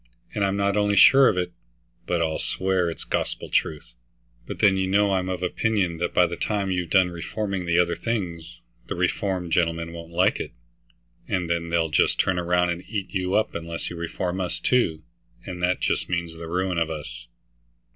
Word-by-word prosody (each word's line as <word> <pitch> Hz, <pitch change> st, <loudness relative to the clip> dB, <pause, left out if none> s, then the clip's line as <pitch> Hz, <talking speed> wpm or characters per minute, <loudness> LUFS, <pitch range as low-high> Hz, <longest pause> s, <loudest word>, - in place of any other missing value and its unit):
"And 100 Hz, -, 0 dB
I'm 100 Hz, 0 st, +1 dB
not 100 Hz, 0 st, +1 dB
only 105 Hz, -1 st, +2 dB
sure 135 Hz, +7 st, +8 dB
of 90 Hz, -, -1 dB
it, 90 Hz, -1 st, -1 dB, 0.5 s
but 85 Hz, -2 st, +1 dB
I'll 80 Hz, -1 st, -1 dB
swear 95 Hz, -2 st, 0 dB
it's 80 Hz, -, -7 dB
gospel -, -, -3 dB
truth. 75 Hz, -6 st, -1 dB, 0.5 s
But -, -, -5 dB
then, 100 Hz, -3 st, +4 dB
you 95 Hz, 0 st, 0 dB
know, 100 Hz, +1 st, +3 dB
I'm 95 Hz, -1 st, 0 dB
of 90 Hz, -1 st, -3 dB
opinion 90 Hz, -3 st, 0 dB
that 85 Hz, -, -1 dB
by 90 Hz, -, +4 dB
the 85 Hz, 0 st, -3 dB
time 100 Hz, 0 st, -1 dB
you've 90 Hz, -2 st, -1 dB
done 95 Hz, -1 st, +4 dB
reforming 95 Hz, +1 st, -3 dB
the 85 Hz, 0 st, +2 dB
other 85 Hz, -1 st, +3 dB
things, 85 Hz, -7 st, -4 dB, 0.3 s
the -, -, -3 dB
reformed 90 Hz, 0 st, -1 dB
gentlemen 85 Hz, 0 st, 0 dB
won't 85 Hz, 0 st, -9 dB
like 90 Hz, +4 st, +2 dB
it, -, -, -5 dB, 0.7 s
and 90 Hz, -3 st, -1 dB
then 85 Hz, 0 st, -1 dB
they'll 85 Hz, -1 st, +1 dB
just -, -, +2 dB
turn 95 Hz, -1 st, +2 dB
round 90 Hz, 0 st, +2 dB
and 85 Hz, +1 st, -4 dB
eat 100 Hz, -3 st, -3 dB
you 95 Hz, 0 st, 0 dB
up 110 Hz, +1 st, +1 dB
unless 85 Hz, 0 st, -5 dB
you -, -, -6 dB
reform 90 Hz, +2 st, -3 dB
us 90 Hz, -1 st, -3 dB
too, 85 Hz, -12 st, +1 dB, 0.4 s
and 90 Hz, -2 st, -6 dB
that 90 Hz, +1 st, +1 dB
just -, -, 0 dB
means 85 Hz, -1 st, -2 dB
the 80 Hz, 0 st, -8 dB
ruin 90 Hz, +1 st, 0 dB
of 80 Hz, -1 st, 0 dB
us." -, -, -7 dB
90 Hz, 195 wpm, -25 LUFS, 85-95 Hz, 0.7 s, sure